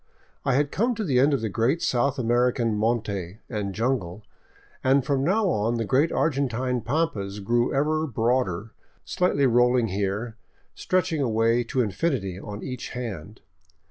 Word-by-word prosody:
I 135 - +1
had 145 +1 +1
come 235 +4 +1
to 220 - -3
the 135 -9 +2
end 140 +3 +4
of 140 - +1
the 110 - -2
great 120 - +1
South 130 +3 +1
American 120 -1 +1
monte 105 -4 -1
and 105 -5 -3
jungle, 110 -5 -2 0.6
and 135 0 +3
from 140 -2 +1
now 195 +7 +2
on 110 -3 0
the 115 -1 -1
great 135 +8 +2
Argentine 130 -4 0
pampas 110 -7 -2
grew 120 +4 +1
ever 155 +3 +1
broader, 115 - 0 0.3
slightly 180 -7 +1
rolling 120 -1 +3
here, 105 +4 -2 0.4
stretching 185 -4 0
away 115 -1 +2
to 130 +2 0
infinity 105 - -2
on 105 +1 -7
each 130 -2 -5
hand. 105 -5 -6
120 Hz, 150 wpm, -25 LUFS, 110-140 Hz, 0.6 s, end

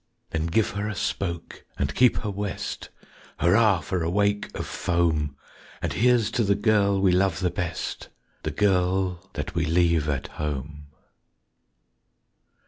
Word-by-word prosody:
_Then 80 +1 -1
give 110 +5 +2
her 105 +1 -3
a 105 - -4
spoke 85 -4 -3
and 70 0 -1
keep 125 -1 +4
her 105 - -1
west, 100 -1 -4 0.5
Hurrah 95 +3 +4
for 90 +4 -2
a 80 - 0
wake 100 +2 +1
of - - -3
foam! 80 -5 0 0.4
And - - -2
here's 120 -2 +3
to 120 - +1
the 100 -1 +3
girl 100 -2 +3
we 95 -1 +4
love 95 0 +2
the 90 -2 0
best 85 -1 -4 0.3
The - - -2
girl 95 +1 +1
that 75 -2 -4
we 85 - 0
leave 85 -1 +2
at 70 -2 -1 0.2
home. 75 0 -4
90 Hz, 145 wpm, -25 LUFS, 80-100 Hz, 0.5 s, keep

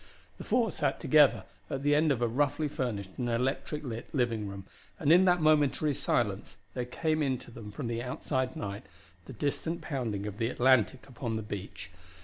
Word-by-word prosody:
The - - -6
four 235 -5 +2
sat - - -1
together 150 -3 +5 0.3
at 135 - -3
the 145 0 +3
end 155 +1 +4
of 120 -3 0
a - - +3
roughly 145 +5 +1
furnished 110 -9 -3
and 120 -1 -1
electric 135 +5 -1
lit 115 -4 -6
living 115 -5 0
room, 100 -1 -7 0.3
and 150 -1 +3
in 180 +2 +6
that 180 -1 +4
momentary 150 -1 +3
silence 105 -6 -1 0.2
there 125 -1 -2
came 155 +5 -1
in 135 -3 +1
to 120 - -13
them 115 -2 -9
from 125 +6 -6
the 115 0 -2
outside 130 +1 -2
night 100 0 -5 0.4
the - - -9
distant 160 +3 -2
pounding 115 - -3
of 105 -1 -6
the 115 - +1
Atlantic 130 0 +3
upon 120 -3 -4
the 110 - -3
beach. 100 -2 -7
130 Hz, 190 wpm, -30 LUFS, 115-145 Hz, 0.4 s, in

